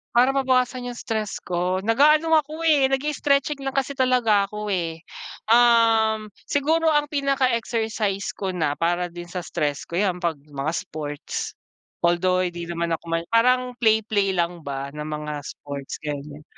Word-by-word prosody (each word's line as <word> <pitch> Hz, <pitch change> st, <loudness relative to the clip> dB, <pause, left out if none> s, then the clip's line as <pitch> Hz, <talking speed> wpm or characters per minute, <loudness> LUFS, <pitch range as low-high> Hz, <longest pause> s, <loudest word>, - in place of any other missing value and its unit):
Para 250 Hz, +3 st, +5 dB
mabawasan 255 Hz, -2 st, +1 dB
'yung 245 Hz, -, -5 dB
stress 215 Hz, -3 st, -3 dB
ko, 180 Hz, +1 st, -1 dB
nag-aano 300 Hz, +8 st, +4 dB
ako 310 Hz, +3 st, -6 dB
eh, 295 Hz, -5 st, +4 dB
nag-i-stretching 280 Hz, +1 st, 0 dB
lang 270 Hz, 0 st, -3 dB
kasi 275 Hz, 0 st, 0 dB
talaga 240 Hz, -6 st, +3 dB
ako, 210 Hz, 0 st, -5 dB
eh. 165 Hz, -2 st, -2 dB, 0.5 s
Uhm, 225 Hz, -2 st, +4 dB, 0.2 s
siguro 315 Hz, +3 st, +1 dB
ang 295 Hz, -1 st, +2 dB
pinaka-exercise 235 Hz, -7 st, 0 dB
ko 195 Hz, -2 st, -4 dB
na 150 Hz, -4 st, 0 dB
para 175 Hz, +1 st, 0 dB
din 175 Hz, 0 st, -8 dB
sa 180 Hz, 0 st, -5 dB
stress 150 Hz, -5 st, -2 dB
ko, 170 Hz, -, -3 dB
'yan 190 Hz, -3 st, +1 dB
'pag 165 Hz, -4 st, -1 dB
mga 145 Hz, +1 st, -3 dB
sports. 145 Hz, -3 st, -5 dB, 0.5 s
Although, 180 Hz, +2 st, +2 dB
di 175 Hz, -1 st, -6 dB
naman 170 Hz, -1 st, -1 dB
ako -, -, -14 dB
may 165 Hz, 0 st, 0 dB
parang 250 Hz, +3 st, +3 dB
play 220 Hz, -1 st, +5 dB
play 200 Hz, -3 st, +1 dB
lang 175 Hz, -1 st, -1 dB
ba 140 Hz, 0 st, -5 dB
ng 150 Hz, 0 st, -5 dB
mga 150 Hz, 0 st, -4 dB
sports, 140 Hz, -1 st, -7 dB
ganyan. 150 Hz, 0 st, -6 dB
210 Hz, 155 wpm, -23 LUFS, 170-255 Hz, 0.5 s, Para